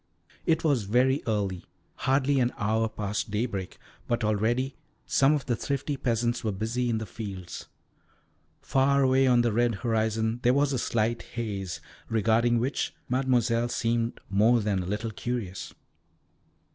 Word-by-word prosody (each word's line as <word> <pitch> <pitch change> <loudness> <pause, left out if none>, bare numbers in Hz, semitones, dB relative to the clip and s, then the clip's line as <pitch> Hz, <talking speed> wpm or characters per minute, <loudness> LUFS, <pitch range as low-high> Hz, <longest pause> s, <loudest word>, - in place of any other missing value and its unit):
It 165 -1 +2
was 140 -9 +2
very 130 +6 +3
early, 100 -5 -1 0.3
hardly 135 +1 +1
an 125 -1 +1
hour 110 +2 +1
past 105 -1 -3
daybreak, 105 -3 -3 0.3
but 120 -1 0
already 115 +6 +1 0.3
some 140 +2 +4
of 145 -4 -1
the 120 - 0
thrifty 140 +3 -2
peasants 120 -2 0
were 110 - 0
busy 115 +5 -1
in 115 - +1
the 110 - -3
fields. 95 -6 -7 1.0
Far 140 +1 +3
away 130 0 +4
on 120 -1 +5
the 120 -2 +1
red 120 0 +2
horizon 110 0 0
there 125 +1 +3
was 140 0 +2
a 130 - 0
slight 115 0 0
haze, 95 -8 -4 0.3
regarding 115 +2 +3
which 130 +5 -1
Mademoiselle 120 -2 +2
seemed 115 0 -1
more 110 +5 +4
than 105 -3 0
a 90 - -5
little 105 +3 -2
curious. 110 -4 -4
115 Hz, 145 wpm, -27 LUFS, 110-125 Hz, 1.0 s, on